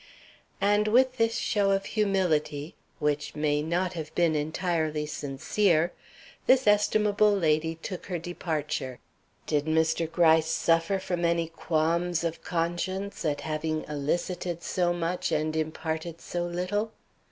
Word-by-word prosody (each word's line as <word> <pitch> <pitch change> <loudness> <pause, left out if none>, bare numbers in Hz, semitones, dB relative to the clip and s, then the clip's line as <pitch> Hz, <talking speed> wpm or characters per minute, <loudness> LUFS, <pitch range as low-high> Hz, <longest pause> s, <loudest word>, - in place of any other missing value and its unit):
And 205 +1 +3
with 255 +3 +4
this 230 -1 +2
show 205 -2 +1
of 195 0 +1
humility, 175 -8 0 0.2
which 150 0 -1
may 150 -1 +1
not 175 +4 -1
have 160 -2 -6
been 170 -2 +3
entirely 155 0 -1
sincere, 155 +5 0 0.5
this 260 0 +5
estimable 210 0 +4
lady 160 -3 +1
took 175 +3 -7
her 180 -3 -2
departure. 150 -6 -3 0.5
Did 150 -1 0
Mr. 160 +1 +1
Gryce 160 -2 +4
suffer 165 +4 +2
from 180 -2 -3
any 170 -1 +1
qualms 165 +1 0
of 165 -1 -3
conscience 180 +4 -2
at 150 -3 -1
having 155 0 -2
elicited 170 +4 -2
so 175 -1 +1
much 175 +1 -1
and 155 +1 0
imparted 160 +1 -3
so 175 0 -3
little? 185 +5 -2
170 Hz, 130 wpm, -28 LUFS, 155-185 Hz, 0.5 s, this